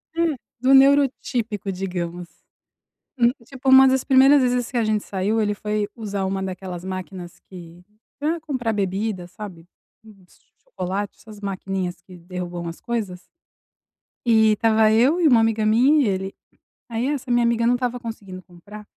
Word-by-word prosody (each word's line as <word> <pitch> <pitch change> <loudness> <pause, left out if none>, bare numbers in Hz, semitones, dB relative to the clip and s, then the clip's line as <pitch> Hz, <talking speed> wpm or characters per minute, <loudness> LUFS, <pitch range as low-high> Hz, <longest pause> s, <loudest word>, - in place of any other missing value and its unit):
Hum, 335 -3 +1 0.2
do 260 +2 +3
neuro 275 +1 +6
típico, 215 -5 -3
digamos. 180 -2 -5 0.9
Hum 240 -1 +4 0.2
tipo 265 +1 -3
uma 265 0 +8
das 260 0 +2
primeiras 270 +1 +5
vezes 250 -1 0
que 250 - -2
a 235 - +2
gente 215 -1 0
saiu, 200 +3 -1
ele 210 -1 0
foi 210 0 -2
usar 205 -4 -3
uma 190 0 -2
daquelas 185 -2 -6
máquinas 185 -1 -7
que 175 -1 -13 0.4
pra 315 +4 -1
comprar 255 -8 -2
bebida, 195 -1 -2
sabe. 180 -3 -10 0.4
Uns 195 -4 -20 0.2
chocolate, 200 - -4
essas 215 -2 -13
maquininhas 190 -3 -4
que 180 0 -14
derrubam 175 -1 -6
as 165 - -8
coisas 205 -7 -4 1.0
e 220 -2 +4
tava 220 -1 +3
eu 255 +10 +3
e 325 - +5
uma 245 -5 +5
amiga 225 -1 +1
minha 260 +8 +4
e - - +1
ele. 190 0 -3 0.5
Aí 235 +2 -2
essa 275 -3 -3
minha 240 0 +3
amiga 235 0 +1
não 245 +1 +3
tava 245 -1 -2
conseguindo 200 -6 -8
comprar. 200 +5 -13
215 Hz, 160 wpm, -22 LUFS, 185-245 Hz, 1.0 s, uma